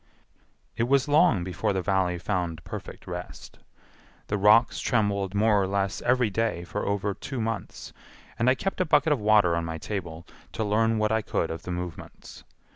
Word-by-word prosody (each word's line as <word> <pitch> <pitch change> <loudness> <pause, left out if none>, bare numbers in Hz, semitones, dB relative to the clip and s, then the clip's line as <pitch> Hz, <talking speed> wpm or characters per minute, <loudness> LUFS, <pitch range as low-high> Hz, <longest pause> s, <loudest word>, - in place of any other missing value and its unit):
It 115 - 0
was 135 +2 +3
long 145 - +4
before 90 +2 -2
the 95 -1 -2
Valley 95 -1 +1
found 85 -3 -3
perfect - - -8
rest. - - -8 0.7
The 105 - 0
rocks 110 +4 +5
trembled 100 -4 0
more 105 0 +3
or 95 - 0
less 100 0 -1
every 125 -3 +2
day 110 -5 -1
for 105 +4 -4
over 100 0 -1
two 135 +4 -6
months, 115 -1 -5 0.5
and 120 +2 +3
I 130 - +4
kept 195 +5 -3
a - - +2
bucket 150 -1 +3
of 140 - -2
water 105 -5 +4
on 85 - -1
my 80 0 -4
table 85 -3 -6 0.3
to 110 - -2
learn 110 +2 +2
what 110 0 +1
I 110 0 +2
could - - -2
of 80 0 -6
the 90 - -6
movements. 90 -1 -8
105 Hz, 185 wpm, -26 LUFS, 90-115 Hz, 0.7 s, rocks